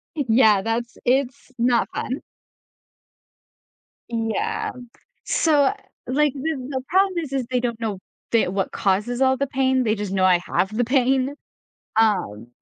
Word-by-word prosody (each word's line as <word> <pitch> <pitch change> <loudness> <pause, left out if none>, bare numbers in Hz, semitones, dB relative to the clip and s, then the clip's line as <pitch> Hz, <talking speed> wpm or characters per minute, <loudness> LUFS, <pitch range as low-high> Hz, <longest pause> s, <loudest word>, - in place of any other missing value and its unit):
I 290 - -1
yeah. 220 -4 +5
That's 230 +3 -3
it's 265 +1 0
not 240 -1 +2
fun. 260 - -3 1.9
Yeah. 225 -2 -2 0.5
So, 290 -4 +3 0.3
like, 290 +2 +2
the 310 +3 -2
the 260 -2 -2
problem 380 0 +2
is 305 -5 -5
is 265 -3 -1
they 250 -1 +1
don't 235 -2 -3
know 215 -4 -3 0.3
the 230 - +3
what 195 +1 -2
causes 210 +6 0
all 265 0 +4
the 280 - -1
pain, 260 -1 +1
they 220 -1 +1
just 205 -2 -4
know 190 -1 +2
I 180 -2 +5
have 195 +3 -1
the 245 - +2
pain, 265 +2 +1 0.6
um, 185 - +1
245 Hz, 145 wpm, -22 LUFS, 220-270 Hz, 1.9 s, yeah